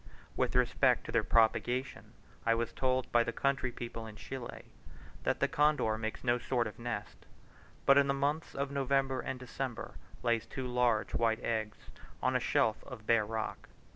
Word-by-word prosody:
With - - 0
respect 125 +1 +3
to - - -5
their 115 -2 +2
propagation, 120 +4 +1 0.3
I 115 0 +3
was 115 0 -2
told 130 -1 0
by 120 0 +5
the 120 - -2
country 135 0 0
people 115 -2 -6
in 110 - -10
Chile, 125 +3 -7 0.6
that - - 0
the - - +4
condor 150 -7 +2
makes 110 0 -4
no 120 -1 +2
sort 120 -1 0
of 110 - -7
nest, 120 +1 -5 0.6
but 140 0 +7
in 140 - +3
the 140 - +2
months 145 +3 -1
of 140 0 -2
November 135 -1 +1
and 130 0 -4
December 130 -1 -5 0.3
lays 115 -2 +1
two 130 - -5
large 125 -3 +1
white 115 -1 +1
eggs 110 -2 -1 0.4
on - - +1
a - - +4
shelf 110 -1 +1
of 120 -5 -10
bare 115 -2 +3
rock. 110 0 -4
120 Hz, 175 wpm, -32 LUFS, 115-135 Hz, 0.6 s, but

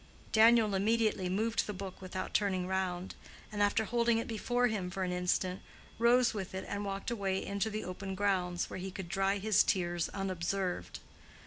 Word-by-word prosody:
Daniel 225 -1 +6
immediately 210 -1 +1
moved 220 +5 0
the 210 - -3
book 190 0 -7
without 185 0 -5
turning 190 -3 +1
round, 185 -1 -2 0.4
and 205 -1 -2
after 205 +2 +3
holding 235 0 +2
it 230 - -2
before 245 +2 0
him 210 -6 -1
for 190 +1 -3
an 180 - -1
instant, 180 +1 0 0.4
rose 240 0 +4
with 190 -3 -5
it 190 - -4
and 200 0 -3
walked 195 +2 -3
away 195 -4 -1
into 200 +2 -1
the 215 0 -4
open 190 +2 -5
grounds, 185 -3 0
where - - -6
he 190 +1 -4
could 190 -1 -7
dry 195 +2 +1
his 210 0 +3
tears 175 -2 0
unobserved. 185 - -2
195 Hz, 180 wpm, -32 LUFS, 185-215 Hz, 0.4 s, Daniel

